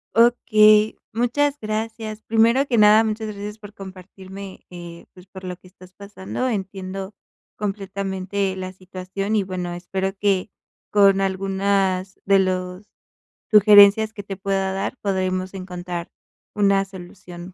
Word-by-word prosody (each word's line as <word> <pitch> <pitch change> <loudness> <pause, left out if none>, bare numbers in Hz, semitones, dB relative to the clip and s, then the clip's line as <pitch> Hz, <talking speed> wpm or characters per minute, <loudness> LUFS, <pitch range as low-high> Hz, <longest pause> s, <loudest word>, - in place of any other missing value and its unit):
Okey, 215 -2 +5 0.2
muchas 275 +5 0
gracias. 220 0 -4
Primero 230 +5 +3
que 240 -4 0
nada, 210 +1 +6
muchas 220 0 -3
gracias 210 +1 -7
por 205 -1 -12
compartirme, 190 0 -11
eh, 175 -1 -10
pues, 185 0 -16
por 190 0 -12
lo 180 -1 -6
que 185 - -19
estás 185 0 -17
pasando. 200 +5 -5
Entiendo 195 -2 -5 0.4
completamente 195 -1 -3
la 185 0 -6
situación, 185 +2 -5
y 205 - +2
bueno, 180 -2 -5
espero 190 +2 -3
que 200 -1 0 0.4
con 195 -1 +5
algunas 195 0 -1
de 195 0 +4
los 185 +1 -2 0.7
sugerencias 210 +1 +7
que 205 - -8
te 195 -2 -7
pueda 195 -1 -1
dar 195 +6 -3
podremos 185 -1 -2
encontrar 180 -2 -6 0.5
una 200 -1 +3
solución 180 -1 -11
195 Hz, 130 wpm, -22 LUFS, 185-210 Hz, 0.7 s, sugerencias